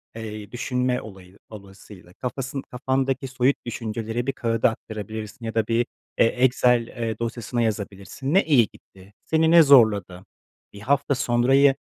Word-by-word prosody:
Eee, 110 -2 -7
düşünme 125 0 -1
olayı 95 -2 -13
dolayısıyla, 100 -3 -13
kafası 130 +3 -5
kafandaki 130 +1 -1
soyut 130 +1 +1
düşünceleri 115 +1 -4
bir 135 - 0
kağıda 115 0 +1
aktarabilirsin 110 0 -7
ya 115 - -5
da 110 -1 +1
bir, 115 +1 +1 0.3
eee, - - +6
Excel, 125 -1 +2
eee, 115 -2 -4
dosyasına 115 +1 -3
yazabilirsin. 105 +5 -3
Ne 195 - +5
iyi 130 -8 +4
gitti, 95 +1 -19
seni 160 0 +2
ne 170 -1 +8
zorladı, 105 - +4 0.5
1 100 - -11
hafta 140 +4 +1
sonrayı 135 +3 +3
115 Hz, 140 wpm, -24 LUFS, 105-130 Hz, 0.5 s, ne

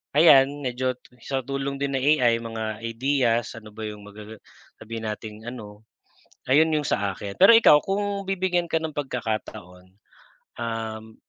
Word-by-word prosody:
ayan 145 -2 +6
medyo 130 0 -1 0.3
sa 135 -1 -2
tulong 140 +1 -3
din 140 -1 -1
ng 130 - -3 0.2
AI 115 -2 +4
mga 115 -1 -5 0.2
ideas, 120 -1 0
ano 110 -1 -12
ba 110 +1 -8
'yong 105 -1 -9
magaga 105 +1 -11 0.4
sabihin 115 0 -6
nating 110 +1 -7
ano 110 -3 -10 0.6
ayon 155 +4 +5
'yong 150 - 0
sa 100 -1 -1
akin. 100 +1 -7
pero 195 +5 +9
ikaw 150 -10 +7
kung 200 0 -2
bibigyan 185 -2 0
ka - - +1
ng 160 -1 -4
pagkakataon. 110 -9 -5 0.7
Um, 110 -1 -5
120 Hz, 150 wpm, -24 LUFS, 110-140 Hz, 0.7 s, pero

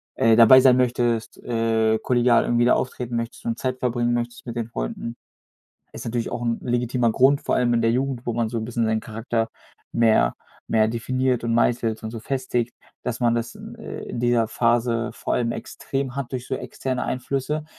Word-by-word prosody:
äh, 115 0 +4
dabei 115 +3 +9
sein 125 -1 +6
möchtest, 120 -2 0
äh, 115 -1 +1
kollegial 120 -1 +3
irgendwie 120 0 +2
da 125 - +5
auftreten 125 -1 -3
möchtest 115 0 -4
und 115 0 -1
Zeit 130 0 -2
verbringen 120 -1 0
möchtest 120 0 -3
mit 120 -1 -6
den 115 -2 -2
Freunden. 115 - -4 0.8
Ist - - -8
natürlich 115 0 -2
auch 120 - -4
'n 115 -1 0
legitimer 120 -1 +1
Grund, 135 +3 +4
vor - - 0
allem 120 -1 +2
in 115 - +2
der 115 0 +3
Jugend, 130 0 -2
wo 120 - 0
man 115 0 0
so 115 +1 -3
'n 110 - -3
bisschen 115 0 -1
seinen 110 0 +1
Charakter 115 0 -2 0.4
mehr 110 - +3 0.4
mehr 110 -1 +4
definiert 125 +2 -1
und 115 0 0
meißelt 115 -1 +1
und 110 - -4
so 115 -1 -7
festigt, 125 -1 -2 0.3
dass 125 -1 -3
man 120 -1 +3
das, 120 0 -3 0.2
äh, - - -7
in - - -4
dieser 120 -2 +2
Phase 115 0 +1
vor - - -4
allem 115 -1 +1
extrem 135 +2 -4
hat 140 -3 -4
durch 125 -1 -5
so - - -2
externe 130 -1 -4
Einflüsse. 140 +4 -2
120 Hz, 195 wpm, -23 LUFS, 115-125 Hz, 0.8 s, dabei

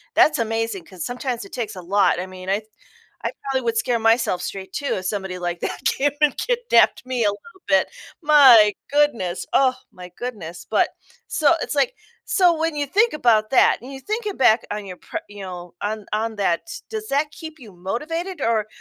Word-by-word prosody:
that's 305 - +5
amazing, 225 -5 -2
'cause 185 -1 -8
sometimes 245 -1 -3
it 195 - -14
takes 220 -4 -4
a 185 - -7
lot. 195 0 +2
I 185 - -6
mean, 185 0 -9
I 200 +1 +2
th 215 0 -21 0.6
I - - 0
probably 270 -2 -1
would 230 -1 0
scare 235 +1 +1
myself 225 -5 +2
straight 190 -1 -6
too, 285 - -1
if 185 - -6
somebody 190 -2 -3
like 175 -1 -3
that - - -3
came 285 +2 +2
and 300 -2 +3
kidnapped 485 - +2
me 255 -1 -2
a 210 - +4
little 345 - -13
bit. 190 -1 +3 0.3
My 265 -9 +7 0.2
goodness. 260 -12 +1
Oh, 260 -1 +4 0.2
my 180 0 -10
goodness. 175 -9 -7
But - - +2 0.4
so, 310 +1 +3
it's, - - -3
like 480 - +1 0.3
so 360 -3 +4
when 325 0 -1
you 290 -1 -1
think 420 - +2
about 225 -7 +3
that, 265 - +5
and 255 +3 -10
you're 270 - -9
thinking 425 - -3
back 235 -3 +4
on 210 0 -4
your 185 -2 -8
pr - - -15
you 205 -1 -10
know, 180 -2 -8
on 210 0 -3
on 220 +1 -1
that, 185 -4 +1
s 340 - -8
does 435 -1 -5
that 290 +2 +1
keep 320 0 -10
you 225 -6 -12
motivated, 305 - -4
or 220 -3 +1
230 Hz, 205 wpm, -22 LUFS, 195-290 Hz, 0.6 s, My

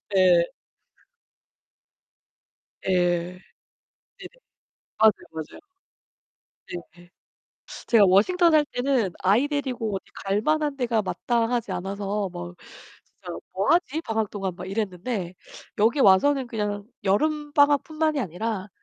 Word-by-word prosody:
예. 180 -2 +5 2.4
예. - - -1 1.3
네네. - - -9 0.7
맞아요, 220 0 +7 0.2
맞아요. 160 -1 -8 1.3
네. 175 0 -18 0.8
제가 220 -4 +6
워싱턴 330 - +4
살 305 -1 +4
때는 245 -6 0
아이 210 +9 +3
데리고 255 -8 -2
어디 190 - -6 0.2
갈만한 290 +9 +1
데가 240 -4 +1
마땅하지 235 +3 -1
않아서 200 +1 -3
뭐 85 0 -8 0.5
'진짜 - - -10 0.2
뭐 195 +5 -1
하지? 320 -3 +1
방학 220 -7 -2
동안.' 195 -3 -4
막 180 - -8
이랬는데 195 -1 -3 0.5
여기 230 +7 +3
와서는 265 +7 +4
그냥 210 -3 -3 0.2
여름방학 290 +6 +2
뿐만이 310 -1 -1
아니라 205 0 -3
220 Hz, 225 characters per minute, -25 LUFS, 195-280 Hz, 2.4 s, 맞아요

